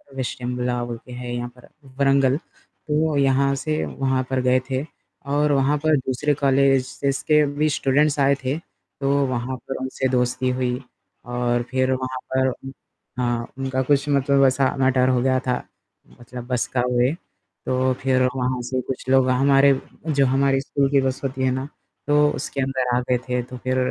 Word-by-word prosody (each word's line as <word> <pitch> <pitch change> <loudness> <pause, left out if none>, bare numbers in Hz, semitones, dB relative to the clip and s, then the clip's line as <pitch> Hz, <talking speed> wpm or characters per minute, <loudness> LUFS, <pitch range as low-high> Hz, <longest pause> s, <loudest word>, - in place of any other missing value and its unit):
विशटिमला 125 -1 -2
बोलके 120 +1 -8
है 125 0 -6
यहाँ 120 0 -4
पर 125 - -16 0.3
व्रंगल। 135 -1 +3
तो 155 -1 -3
यहाँ 140 0 +3
से 155 +3 -2
वहाँ 130 -1 -1
पर 130 -1 0
गए 125 0 +3
थे 130 +1 -1 0.5
और 145 +1 +2
वहाँ 140 +2 +2
पर 155 0 +2
दूसरे 135 +3 -1
कॉलेजेज़ 135 0 +1
के 150 -1 +5
भी 155 +1 +2
स्टूडेंट्स 145 +1 +1
आए 140 0 +4
थे, 130 +3 -1
तो 140 -4 -7 0.2
वहाँ 125 0 -3
पर 135 - -6
उनसे 130 0 -2
दोस्ती 125 0 0
हुई 125 0 -1 0.4
और 120 0 -1
फिर 130 0 +1
वहाँ 130 0 -3 0.2
पर 130 0 +3
उ 135 +1 -8 0.5
हाँ, 120 -1 -1
उनका 130 -1 -1
कुछ 140 +2 +1
मतलब 140 -1 +3
ऐसा 130 0 +2
मैटर 130 -1 +3
हो 125 -1 +2
गया 130 0 +2
था 125 - +2 0.7
मतलब 120 0 -9
बस 125 -2 0
का 125 - +2
हुए। 125 +1 +3 0.5
तो 130 0 +1
फ़िर 130 -1 +2
वहाँ 125 -1 -1
से 130 +1 -2
कुछ 130 - -4
लोग 130 -1 +4
हमारे 135 +2 +5 0.3
जो 140 -3 +3
हमारी 135 +1 +2
स्कूल 140 0 0
की 140 -1 +4
बस 130 0 -1
होती 130 -1 -2
है 130 - +2
ना 130 +2 -3 0.4
तो 150 0 +4
उसके 140 - -4
अंदर 130 -2 0
आ - - +3
गए 125 - +3
थे 125 0 0
तो 125 +1 -9
फिर 130 0 0
130 Hz, 175 wpm, -22 LUFS, 125-140 Hz, 0.7 s, के